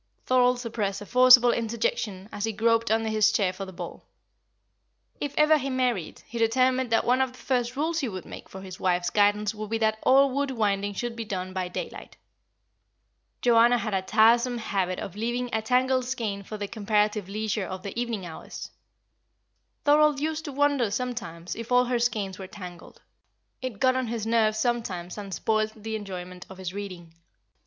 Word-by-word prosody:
Thorold 250 -1 +3
suppressed 215 -5 -3
a - - -7
forcible 250 +1 +7
interjection 230 - -2
as 205 - -3
he 225 - -1
groped 230 +2 +2
under 225 0 +1
his 215 -1 +3
chair 190 -4 +1
for 195 +1 -6
the 190 - -9
ball. 175 -2 -8 1.2
If 290 -1 -4
ever 305 0 +5
he 275 0 -3
married, 250 -9 -1
he 235 - -6
determined 255 +2 +2
that 225 - +2
one 250 +2 +3
of 260 -1 0
the - - -15
first 250 -2 -1
rules 320 +4 0
he 270 -6 -1
would 185 -3 -7
make - - -10
for 190 - -9
his 190 -1 -9
wife's 175 -1 +1
guidance 205 0 +2
would 215 -1 -6
be 225 - 0
that 220 -1 +1
all 275 +1 +5
wool 280 +2 0
winding 205 -5 -1
should 240 +2 -3
be 230 - -4
done 185 -3 -4
by 185 -1 -2
daylight. 180 - -7 1.3
Joanna 240 0 +5
had 220 -3 -3
a 190 - +1
tiresome 235 +5 +4
habit 195 -5 -1
of 190 - -6
leaving 240 +3 -2
a 220 - +1
tangled 255 +2 +2
skein 225 -6 -3
for 215 +2 -7
the 205 -1 -4
comparative 210 -2 0
leisure 215 -1 -2
of 185 0 -6
the 200 - -5
evening 230 -5 -2
hours. 165 -2 -8 1.1
Thorold 295 -1 +5
used 315 +1 -2
to 290 - -4
wonder 280 -4 +2
sometimes 205 -8 -4
if 230 +1 -7
all 250 0 +5
her 245 -1 0
skeins 215 -6 -1
were 190 - -7
tangled. 180 -3 -11 0.6
It 255 -6 -5
got 255 -1 +3
on 260 -1 -1
his 225 -1 -3
nerves 220 -1 +2
sometimes 215 -7 -2
and 200 -1 -7
spoilt 215 +4 0
the 220 0 -5
enjoyment 180 -3 -7
of 190 - -11
his 185 -1 -5
reading. 185 -5 -7
220 Hz, 185 wpm, -26 LUFS, 195-250 Hz, 1.3 s, forcible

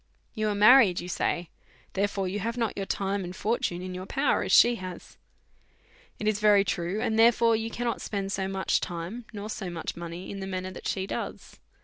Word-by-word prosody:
You 215 -2 -1
are 205 - -1
married, 210 -3 +7
you 175 - -6
say; 175 -1 -2 0.4
therefore 200 -1 0
you 195 +3 -3
have 230 +4 -3
not 230 -3 -1
your 195 -1 -4
time 195 0 -1
and 180 +1 -7
fortune 190 -5 -1
in 185 0 -5
your 185 +1 -6
power 275 +5 +1
as - - -2
she 240 0 +6
has. 185 -3 -8 1.0
It 215 - -3
is 215 -1 +1
very 210 -2 +5
true; 180 +1 -2
and 220 0 0
therefore 230 0 +5
you 225 +1 -2
cannot 235 0 -3
spend 195 -2 -3
so 190 -1 -1
much 190 0 0
time, 175 +8 -5
nor 210 -1 -6
so 205 -3 -5
much 165 -2 -5
money, 170 +1 -7
in 200 - -6
the 190 - -5
manner 185 0 -4
that 185 - -7
she 190 -1 -1
does. - - -6
195 Hz, 210 wpm, -27 LUFS, 185-220 Hz, 1.0 s, married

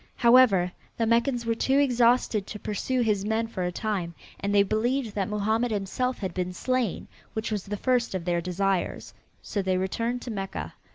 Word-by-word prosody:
However, 235 -7 +5 0.3
the 230 - +1
Meccans 235 +2 +1
were 230 - +1
too 265 +4 +1
exhausted 245 -6 +3
to - - -6
pursue 245 +5 -1
his 210 -4 +1
men 220 +2 0
for 210 -4 -5
a 180 0 0
time 180 -4 -3 0.2
and 200 - -2
they 200 -1 +5
believed 230 +3 0
that 195 -2 -1
Mohammed 220 +3 +1
himself 220 +5 -1
had 190 -4 -4
been 180 0 -2
slain, 255 0 -1 0.3
which 220 0 -3
was 210 -3 -2
the 205 +1 -4
first 245 -3 +1
of 175 -3 -3
their 175 -1 +1
desires. 185 +1 -1 0.3
So 205 - -2
they 185 -1 0
returned 230 +6 -2
to 245 - -5
Mecca. 195 -2 -5
215 Hz, 185 wpm, -27 LUFS, 195-240 Hz, 0.3 s, However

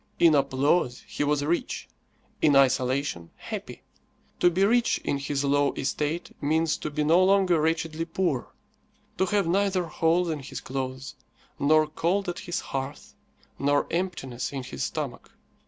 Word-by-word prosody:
In 165 -2 +6
applause 140 0 +1
he - - -2
was 145 0 +1
rich, 170 +3 -2 0.5
in 150 -3 +4
isolation 130 - +2
happy. - - -7 0.6
To 175 - +5
be 185 +3 +2
rich 235 +2 +3
in 140 - -1
his 140 0 -2
low 145 0 +2
estate 150 +5 -3
means 160 +2 +1
to - - -4
be 150 0 -1
no 165 +5 +5
longer 190 -4 +4
wretchedly 160 0 -1
poor 165 -6 -1 0.7
to 190 - +2
have 200 0 +1
neither 190 +1 +1
holes 165 +2 +1
in 155 - -3
his 135 - -7
clothes, 130 0 -5 0.5
nor 155 +2 +4
cold 175 +6 -1
at 175 - -3
his 175 - -3
hearth, 135 +1 -6 0.5
nor 145 +1 +2
emptiness 170 -9 -3
in 135 -2 -4
his 130 - -5
stomach. - - -5
155 Hz, 150 wpm, -26 LUFS, 140-175 Hz, 0.7 s, In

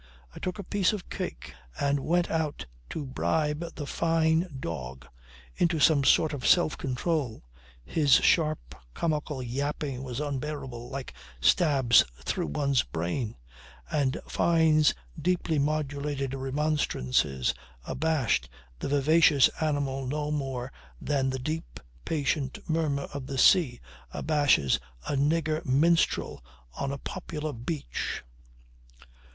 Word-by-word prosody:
I - - -9
took 185 +1 -3
a 200 - -5
piece 200 +1 +1
of 205 -4 -6
cake - - -5 0.3
and 140 0 +1
went 175 +5 +1
out 160 -3 -1 0.2
to 150 - -4
bribe 150 +4 -1
the 145 - -5
Fyne 165 +2 +2
dog 65 - -6 0.5
into 170 -2 +1
some 145 0 +5
sort 155 +3 +4
of 135 -4 -5
self 175 -3 +4
control. 135 - -2 0.4
His 145 - +2
sharp 155 -2 +2 0.2
comical 150 -4 -1
yapping 140 +1 -3
was 130 -1 -5
unbearable, 140 -4 -4
like 135 - -6 0.3
stabs 130 - +5
through 70 - -2
one's 140 - +1
brain, 90 +8 -3 0.6
and 145 -1 +1
Fyne's 160 -3 +3 0.3
deeply 175 -3 +1
modulated 145 -2 -1
remonstrances 135 - 0 0.3
abashed 140 - 0 0.3
the - - -3
vivacious 145 0 +5
animal 140 -3 -1
no 150 +2 -2
more 135 -4 -3 0.3
than 135 -3 0
the 130 - -2
deep, 155 +6 -4 0.3
patient 145 -3 -1
murmur 155 -4 0
of 140 -2 -5
the 135 - -4
sea 130 -3 +5 0.3
abashes 145 - +2 0.3
a - - -1
nigger 155 +2 +1
minstrel 160 - +2 0.3
on 140 - -2
a 140 - -3
popular 155 -2 -5
beach. 120 - -4
145 Hz, 120 wpm, -28 LUFS, 130-160 Hz, 0.6 s, some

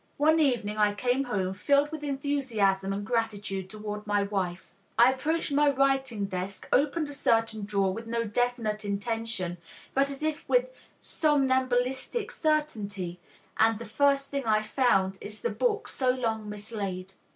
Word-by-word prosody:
One 315 +2 +4
evening 235 -8 +1
I 210 -1 +3
came 250 +5 +1
home 190 -6 -1
filled 280 +9 +2
with 310 -1 -6
enthusiasm 260 -9 0
and 200 +1 -3
gratitude 205 -5 -2
toward 210 0 -6
my 205 -1 +2
wife. 190 -3 -3 0.2
I 240 +3 +7
approached 310 +4 -1
my 290 +1 +4
writing 270 -5 +1
desk, 190 0 -5
opened 300 +3 +2
a - - -5
certain 225 -5 +1
drawer 200 -2 +1
with 230 +3 -7
no 230 0 0
definite 225 -1 -1
intention 200 -3 -2 0.3
but 275 +1 +2
as 275 +1 -4
if 315 +1 -2
with - - +3 0.3
somnambulistic 260 - +1
certainty, 205 - -1 0.4
and 225 0 +4
the 230 - -7
first 275 +5 +2
thing 280 -2 -2
I 215 -1 +3
found 195 -5 +2
is 210 +1 -8
the 475 - -1
book 445 -3 0
so 260 -2 -1
long 225 -4 -1
mislaid." 200 -3 -5
230 Hz, 150 wpm, -28 LUFS, 205-275 Hz, 0.4 s, I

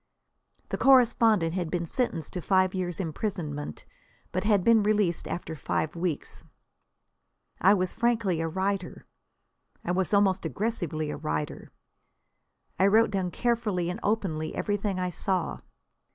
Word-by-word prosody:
The - - -3
correspondent 230 -9 +4
had 175 -3 -2
been 170 0 -1
sentenced 165 - -2
to 180 - -3
five 185 0 +2
years' 180 -3 -3
imprisonment, 155 - -4 0.5
but 185 - -1
had 205 -3 +3
been 230 0 +5
released 205 -5 +1
after 165 -2 -5
five 155 +1 -2
weeks. 170 -3 -3 1.2
I 195 +3 +6
was 185 -2 -1
frankly 225 -8 +1
a 165 - -1
writer. 190 +1 -2 0.8
I 175 - 0
was 185 +1 0
almost 200 -2 +3
aggressively 175 -9 -2
a - - -5
writer. 75 0 -4 1.1
I 190 - +5
wrote 220 +3 +4
down 190 -3 -1
carefully 210 -6 0
and 185 - -6
openly 190 -8 -1
everything 205 -2 -1
I 180 0 -1
saw. 185 0 -1
185 Hz, 135 wpm, -27 LUFS, 170-210 Hz, 1.2 s, I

